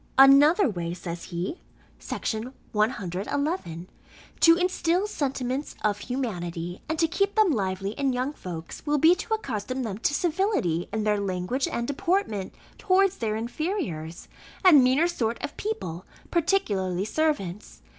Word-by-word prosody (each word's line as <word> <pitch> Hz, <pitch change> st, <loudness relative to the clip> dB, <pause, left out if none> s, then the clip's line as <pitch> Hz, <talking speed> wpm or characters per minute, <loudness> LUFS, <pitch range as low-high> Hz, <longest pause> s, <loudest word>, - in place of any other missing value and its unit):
"Another 285 Hz, +8 st, +7 dB
way," 175 Hz, -6 st, -3 dB
says 170 Hz, -1 st, -6 dB
he 180 Hz, -, -4 dB, 0.4 s
(Section 225 Hz, +4 st, -4 dB, 0.2 s
111), 210 Hz, -, -2 dB, 0.5 s
"to 330 Hz, 0 st, +7 dB
instil 360 Hz, +1 st, +1 dB
sentiments 275 Hz, -6 st, -3 dB
of 205 Hz, -1 st, +1 dB
humanity, 175 Hz, -9 st, -4 dB
and 320 Hz, -, -1 dB
to 325 Hz, -, +3 dB
keep 395 Hz, +4 st, 0 dB
them 430 Hz, -5 st, +4 dB
lively 195 Hz, -4 st, -1 dB
in 275 Hz, +4 st, 0 dB
young 255 Hz, +3 st, -1 dB
folks, 170 Hz, -, -8 dB
will 295 Hz, 0 st, +3 dB
be, 320 Hz, +4 st, +6 dB
to 440 Hz, +4 st, -1 dB
accustom 255 Hz, -, -4 dB
them 210 Hz, -3 st, -4 dB
to 285 Hz, -, +1 dB
civility 330 Hz, -, 0 dB
in 220 Hz, 0 st, -1 dB
their 210 Hz, -1 st, +2 dB
language 195 Hz, +7 st, -1 dB
and 235 Hz, 0 st, -2 dB
deportment 285 Hz, -, -1 dB, 0.2 s
towards 390 Hz, -1 st, +3 dB
their 215 Hz, -2 st, -1 dB
inferiors, 230 Hz, -, -4 dB, 0.4 s
and 300 Hz, -8 st, +8 dB
meaner 265 Hz, +7 st, +4 dB
sort 235 Hz, -9 st, -1 dB
of -, -, -4 dB
people, 195 Hz, -, -4 dB, 0.2 s
particularly 205 Hz, -, +1 dB
servants. 215 Hz, -, -2 dB
250 Hz, 135 wpm, -26 LUFS, -, 0.5 s, and